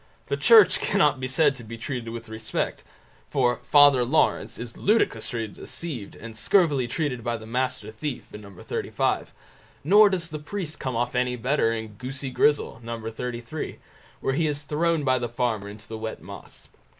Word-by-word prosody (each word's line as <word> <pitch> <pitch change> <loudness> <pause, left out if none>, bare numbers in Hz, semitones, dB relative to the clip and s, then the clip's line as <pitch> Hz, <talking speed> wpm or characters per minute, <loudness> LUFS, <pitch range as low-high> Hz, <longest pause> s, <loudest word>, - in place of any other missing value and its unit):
The - - +1
Church 450 -2 +7
cannot 145 -3 +2
be 130 - -2
said 145 +2 +3
to 125 -3 -10
be 115 +1 -8
treated 115 0 -4
with 115 0 -7
respect, 110 0 -3 0.5
for 125 -3 +2
"Father 145 -3 +6
Lawrence" 120 -4 +1
is 120 0 -7
ludicrously 130 - +1
deceived 120 - -7
and 115 -1 -10
scurvily 145 - +3
treated 125 -3 -2
by 120 -1 -1
the 110 - -11
Master 125 -2 -2
Thief, 125 +4 -5
No. 105 -1 -9
xxxv; 95 - -2 0.6
nor 205 +7 +7
does 175 -4 -2
the 155 -1 -5
priest 160 0 -5
come 130 -3 -3
off 120 +1 -1
any 125 0 +1
better 125 -1 +1
in 110 -1 -3
Goosey 130 +1 -4
Grizzel, 145 -2 +2
No. 115 0 -5
xxxiii, 120 +5 -5 0.4
where 135 - 0
he 155 +3 +1
is 145 -1 -2
thrown 160 +2 0
by 130 -2 +2
the 120 -1 -3
Farmer 115 -4 -1
into 105 +1 -11
the 110 -1 -6
wet 110 0 -5
moss. - - -10
125 Hz, 175 wpm, -25 LUFS, 115-150 Hz, 0.6 s, Church